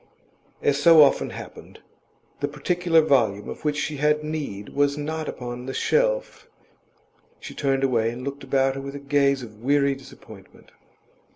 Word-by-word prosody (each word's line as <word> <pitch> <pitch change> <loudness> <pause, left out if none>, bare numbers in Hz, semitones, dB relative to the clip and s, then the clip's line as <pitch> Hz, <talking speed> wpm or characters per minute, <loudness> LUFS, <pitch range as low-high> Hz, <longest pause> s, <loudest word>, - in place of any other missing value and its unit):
As 145 0 +1
so 160 0 +8
often 140 - +2
happened, - - -10 0.6
the - - -1
particular 175 -2 +1
volume 115 -9 +1
of - - -8
which 150 -1 0
she 150 0 -3
had 150 +1 +1
need 145 -10 -5
was 145 0 +1
not 155 +1 -4
upon 125 0 -7
the 135 - -5
shelf. - - 0 0.9
She - - -9
turned 135 -1 0
away, 115 -4 +2
and 120 +2 -7
looked 140 +1 -6
about 135 0 +1
her 135 - -6
with 140 +1 -7
a - - -6
gaze 140 -1 +1
of 105 -2 -12
weary 140 +2 +2
disappointment. 135 0 -15
140 Hz, 160 wpm, -24 LUFS, 135-150 Hz, 0.9 s, so